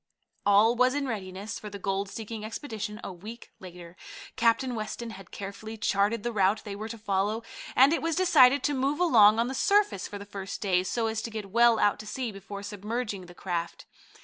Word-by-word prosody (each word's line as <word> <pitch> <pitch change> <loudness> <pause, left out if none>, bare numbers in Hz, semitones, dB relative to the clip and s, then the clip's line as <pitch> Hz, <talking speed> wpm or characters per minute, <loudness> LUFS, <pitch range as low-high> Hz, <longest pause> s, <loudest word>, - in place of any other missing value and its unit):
All 210 +4 +5
was 255 +2 +3
in 285 -1 -1
readiness 200 -1 -5
for 210 - -8
the 200 - -7
gold 195 0 -2
seeking 220 0 -6
expedition 220 -2 -5
a 195 - -6
week 215 +7 -10
later. 175 -2 -11 0.4
Captain 245 +1 +2
Weston 230 +1 -5
had 195 -3 -11
carefully 205 +3 -7
charted 205 +1 +1
the 240 - -1
route 200 0 +2
they 205 -2 -6
were 215 +2 -6
to 230 - -6
follow, 210 +1 -1 0.3
and 270 +4 +6
it - - 0
was 330 -1 0
decided 285 -7 +5
to 290 - +1
move 275 +3 0
along 220 -11 +6
on 230 - +2
the 260 - -3
surface 400 - +2
for 205 - -7
the 200 - -9
first 195 -2 -6
day, 185 -3 +2
so 225 +5 -1
as 220 0 -1
to 230 - -5
get 215 -3 -7
well 235 +1 +5
out 205 - +2
to 215 - -9
sea 245 +2 -3
before 200 0 -8
submerging 205 -1 -4
the 175 - -14
craft. 170 -2 -4
215 Hz, 205 wpm, -28 LUFS, 200-235 Hz, 0.4 s, and